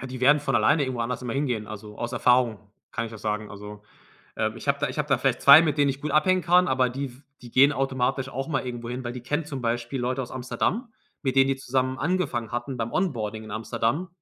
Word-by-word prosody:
Ja, 135 - -6
die 130 -1 -7
werden 145 +3 +5
von 135 -3 -2
alleine 145 +8 +3
irgendwo 130 -3 -2
anders 125 +2 -3
immer 120 -2 -3
hingehen. 125 -6 -1
Also, 105 0 -9
aus 120 +1 -4
Erfahrung 120 -4 +2 0.2
kann 115 - -2
ich - - -9
das 110 -2 -11
sagen. 105 0 -2
Also, 105 0 -10 0.5
ähm, - - -1
ich - - -10
habe - - +2
da - - +1
ich - - -6
habe - - -1
da - - +3
vielleicht - - 0
2, 140 +3 +10
mit 155 -3 0
denen 145 -1 +4
ich 135 +1 -6
gut 150 - -3
abhängen 185 +4 +3
kann, 180 +2 +4
aber 130 -1 +2
die 135 +3 -3
f 125 +2 -14 0.2
die 120 - -11
gehen 140 +4 +5
automatisch 135 -1 -1
auch 135 +2 -4
mal 135 -5 -1
irgendwo 120 -1 -5
hin, 125 +1 -4
weil 120 - -3
die 125 -1 -8
kennen 150 +6 -1
zum 135 -3 -6
Beispiel 120 +2 -2
Leute 125 +2 -1
aus 125 - -8
Amsterdam, 195 - -2 0.3
mit 135 -2 -1
denen 135 0 +5
die 135 - +1
zusammen 130 0 -1
angefangen 145 -9 -1
hatten 120 +2 -3
beim 115 -1 -3
Onboarding 110 - -2
in 110 - -10
Amsterdam 115 - -2
130 Hz, 255 wpm, -25 LUFS, 115-140 Hz, 0.5 s, 2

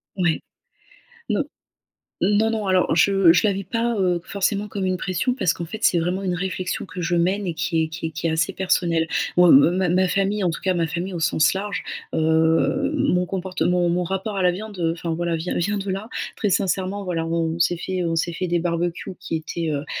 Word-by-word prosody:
Ouais. 175 -4 +1 0.9
Non. - - +1 0.8
Non, 210 +2 +3
non, 215 -3 -2
alors, 185 -3 +2
je 195 -2 +5
je 175 +5 +3
la 200 - +2
vis 195 +1 -4
pas, 230 +4 -1
heu, 180 -2 +1
forcément 200 +1 -1
comme 200 -1 -4
une 185 -1 0
pression 185 +8 -1
parce 185 -10 +1
qu'en 170 - -6
fait, 195 +7 -6
c'est 175 - +4
vraiment 180 +3 -1
une 180 -2 -1
réflexion 185 0 -3
que 170 +2 -9
je 175 +1 0
mène 185 +3 +1
et 170 - -1
qui 165 0 0
est - - -1
qui 160 +1 -5
est - - -4
qui 160 +2 -3
est - - +1
assez 160 +4 +1
personnelle. 170 -3 +1 0.3
Moi, 180 -1 +7
ma 175 +7 +5
ma 185 +2 +3
famille, 195 +1 0
en 175 - +2
tout 160 - -4
cas, 185 -1 +1
ma 170 -2 +1
famille 175 +3 -4
au 170 - -4
sens 155 +1 +3
large, 200 +1 -3 0.3
heu, 160 - +2
mon 180 -11 +1
comportement, 180 -1 0
mon 175 +1 +1
rapport 195 +4 -3
à 190 - 0
la 180 - +4
viande, 205 +2 -7
enfin 165 0 -3
voilà, 170 0 -1
vient 165 +3 -3
vient 205 +4 0
de 195 0 -4
là. 195 +5 -4 0.3
Très 205 - -1
sincèrement, 195 +1 0
voilà, 165 -2 -2
on 165 0 -1
s'est 170 +1 +2
fait, 185 +1 -3
heu, 170 - 0
on 165 - -1
s'est 170 +1 -1
fait 185 +1 -3
des 170 0 +1
barbecues 175 +1 -2
qui 180 -3 -3
étaient, 160 +1 -4
heu 145 - 0
heu, 145 - -8
180 Hz, 230 wpm, -22 LUFS, 165-195 Hz, 0.9 s, Moi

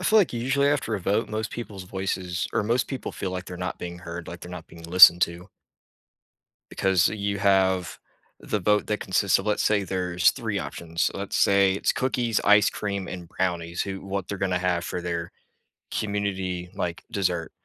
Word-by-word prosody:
I - - -7
feel 220 +3 +5
like 195 - +3
u 120 - -3
usually 135 +3 +2
after 140 -6 0
a - - -6
vote, 100 +5 0
most 110 0 -3
people's 100 -5 -7
voices 95 -2 -3
or - - +1
most 120 +3 +1
people 135 - -5
feel 95 - -4
like 90 0 -4
they're 90 - -8
not 90 +1 -4
being 85 0 -7
heard, 85 -1 -7
like 85 - -8
they're 90 - -9
not 90 -2 -8
being 85 - -14
listened 90 0 +8
to 85 +3 -2 1.2
because 95 -2 +3
you 100 -1 -2
have 95 -3 +2 0.4
the 105 - -2
vote 105 +2 +2
that 105 - -1
consists 95 +1 +2
of 95 - -5
let's 105 -1 +1
say 105 -2 +2
there's 90 -3 +2
3 - - -3
options. 85 0 -3
So, - - -1
let's 100 0 -4
say 100 -1 +4
it's 100 - +1
cookies, 120 -4 0
ice 105 0 +6
cream, 100 -2 -4
and 90 -2 -7
brownies, 85 -2 -2
who 95 -1 -4
what 95 -1 -3
they're 100 - -4
gonna 95 -2 0
have 90 -2 0
for 90 - -4
their 85 -1 -3 0.6
community, 95 -4 -2
like, 85 -1 -3
dessert. 90 -4 -1
95 Hz, 195 wpm, -25 LUFS, 90-105 Hz, 1.2 s, listened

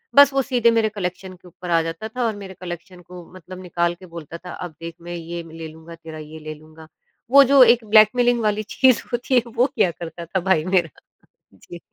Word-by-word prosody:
बस 285 -1 +8
वो 270 - +2
सीधे 245 -3 +2
मेरे 225 -1 +2
कलेक्शन 185 -2 -5
के 180 0 -17
ऊपर 180 +1 -10
आ 165 -1 +3
जाता 165 +6 -5
था 245 +3 -4
और 220 -2 -1
मेरे 195 -2 -9
कलेक्शन 175 +1 -8
को 180 0 -12
मतलब 185 0 -11
निकाल 175 -1 -1
के 185 +2 -15
बोलता 170 -1 -9
था, 180 0 -10
"अब 175 -4 -8
देख 165 0 -7
मैं 175 +1 -7
ये 170 0 -6
ले 160 0 -8
लूँगा, 160 +1 -12
तेरा 160 -1 -11
ये 155 +1 -10
ले 155 0 -7
लूँगा।" 155 +1 -16 0.4
वो 280 0 +9
जो 275 0 +5
एक 235 0 +4
ब्लैकमेलिंग 235 +3 +4
वाली 215 0 0
चीज़ 260 -3 +3
होती 250 +2 0
है 245 - +5
वो 245 - +4
किया 175 - +2
करता 170 0 -8
था 190 +3 -2
भाई 190 -4 +2
मेरा। 185 -3 +1 0.7
जी। 175 - -12
180 Hz, 220 wpm, -21 LUFS, 165-220 Hz, 0.7 s, वो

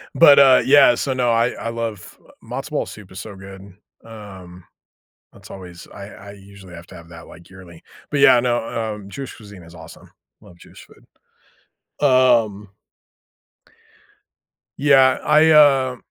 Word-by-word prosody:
but, 145 -4 +6
uh, 135 -2 +5
yeah. 140 -3 +5
So, 135 +2 -3
no, 125 -2 -1
I 115 +1 +1
I 115 - -7
love 115 -4 -8 0.2
matzo - - -8
ball - - -3
soup 105 -3 -14
is 95 - -10
so 100 -1 -10
good. 95 0 -13 0.4
Um, 95 -5 -14 0.7
that's - - -18
always 90 -3 -13
I 100 -1 -10
I 100 -1 -14
usually 100 -2 -16
have 85 +1 -13
to 90 - -14
have 85 -1 -15
that, 85 0 -14
like, 85 - -17
yearly. 90 -3 -16 0.3
But, 145 - -2
yeah, 125 - +5
no. 115 -2 -4
Um, 100 -2 -13
Jewish 135 +5 -10
cuisine 100 -4 -15
is 85 +1 -16
awesome. 80 0 -15 0.3
Love 85 - -19
Jewish - - -17
food. - - -24 1.0
Um 120 -6 +1 2.1
Yeah. 135 -2 +3
I, 155 +1 +3
uh, 135 -4 +3
105 Hz, 155 wpm, -19 LUFS, 95-130 Hz, 2.1 s, but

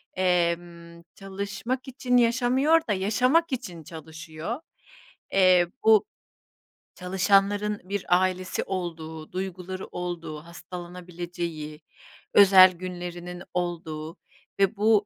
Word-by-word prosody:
emm, 170 -2 -1
çalışmak 200 +6 -4
için 250 -1 0
yaşamıyor 255 +7 +3
da - - +3
yaşamak 250 - +2
için 180 -11 -5
çalışıyor. 160 - -7 0.7
Eee, 185 -2 +5 0.2
bu 220 -2 +6 0.9
çalışanların 200 +3 +1
bir 200 0 -3 0.2
ailesi 185 0 -1
olduğu, 160 -4 -5
duyguları 185 0 -5
olduğu, 175 -3 -5
hastalanabileceği, 175 -3 -7 0.5
özel 190 -2 +8
günlerinin 180 0 -7
olduğu 165 -2 -4 0.4
ve 195 +2 +3
bu 210 -1 +4
185 Hz, 90 wpm, -26 LUFS, 170-205 Hz, 0.9 s, özel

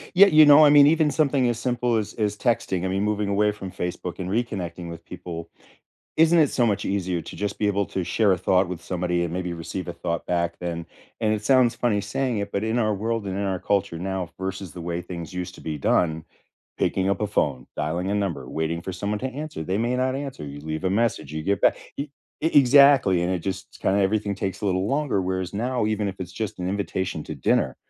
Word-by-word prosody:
Yeah, 200 +3 +9
you 155 -4 +7
know, 145 +1 +8
I 150 - +7
mean, 145 -1 +8
even 155 +1 +4
something 140 -4 +2
as 115 -1 -2
simple 120 -1 0
as 105 -1 -3
as 105 -2 -1
texting, 100 -6 0
I - - +1
mean, 95 +1 -1
moving 105 -1 0
away 105 +1 +2
from 95 -3 -8
Facebook 90 0 -5
and 90 -1 -4
reconnecting 95 -6 -3
with 85 0 -9
people, 85 -2 -7 0.7
isn't 165 +2 +5
it 155 -4 +5
so 125 - +1
much 105 -3 0
easier 95 -3 -1
to - - -9
just 100 -1 -3
be 105 - 0
able 100 -1 +1
to 95 - -3
share 100 +4 +2
a 95 - +2
thought 95 +1 +2
with 85 -1 -6
somebody 90 -1 -1
and 85 -1 -3
maybe 90 -1 -3
receive 85 +3 -6
a 85 - -4
thought 85 -1 -4
back 85 -1 0
then, 85 -1 -4 0.4
and 110 -1 +2
it 105 -1 -3
sounds 130 0 +4
funny 115 -3 0
saying 120 +4 -1
it, 100 0 -3
but 100 - -1
in 110 +2 0
our 110 -3 +2
world 110 +2 -2
and 95 -1 -3
in 100 +1 -1
our 95 -1 -1
culture 100 -3 0
now 95 0 -3
versus 95 -2 -5
the 90 - -7
way 85 +1 -3
things 85 -1 -7
used 90 0 -5
to - - -13
be 80 -1 -4
done, 80 +3 +1 0.5
picking 95 0 +1
up 100 - 0
a 105 - 0
phone, 70 -10 0
dialing 85 +5 -2
a - - +1
number, 85 -11 -2
waiting 80 +1 -2
for 95 - -5
someone 100 +3 -2
to 130 - -2
answer, 145 - -5
they 95 +4 -1
may 120 +2 0
not 130 +1 0
answer, 135 - -5
you 70 0 -8
leave 80 +2 -5
a 95 - +1
message, 105 -9 0
you 80 - -3
get 100 +3 0
back - - +4 0.2
e 140 - -1 0.4
e 160 - +3
exactly, 135 -9 +6
and 90 +2 0
it 90 - -1
just 95 +2 -6
kind 95 - +2
of 100 - +3
everything 100 0 0
takes 95 -1 -4
a 105 - 0
little 95 +1 0
longer, 140 -4 0
whereas 95 -1 -2
now, 120 +1 0
even 105 -1 -1
if 95 - -4
it's 90 -1 -6
just 105 +1 -5
an 90 0 -2
invitation 95 -4 -2
to - - -6
dinner. 70 - +1
100 Hz, 245 wpm, -24 LUFS, 90-115 Hz, 0.7 s, Yeah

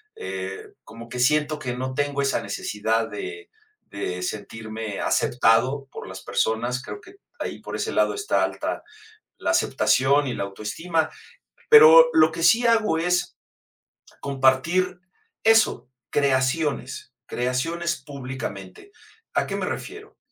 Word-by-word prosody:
eh, 95 0 -6
como 115 +1 -12
que 125 - -6
siento 150 +3 +2
que 125 -5 -4
no 130 +1 -4
tengo 145 +1 -1
esa 140 - 0
necesidad 110 +3 -2
de 410 +2 -7 0.4
de 90 -3 -4
sentirme 110 +1 -5
aceptado 125 +4 +2
por - - -9
las 95 0 -9
personas, 120 +6 -1
creo 410 - -8
que 370 +1 -16 0.2
ahí - - -5
por - - -7
ese - - -2
lado - - +2
está 410 0 0
alta - - -3 0.5
la - - -1
aceptación 140 +2 +2
y 125 - -2
la - - -3
autoestima, 160 - -2 0.6
pero 470 +2 +9
lo 325 - +5
que 165 - -3
sí 235 +6 +5
hago 220 -7 +3
es 180 +1 0 0.8
compartir 140 +7 +1 0.4
eso, 225 - +3 0.2
creaciones, 135 -1 0
creaciones 165 +8 -2
públicamente. 130 - -8 0.4
¿A - - +1
qué - - -3
me - - -3
refiero? 425 +1 -7
135 Hz, 130 wpm, -24 LUFS, 115-170 Hz, 0.8 s, pero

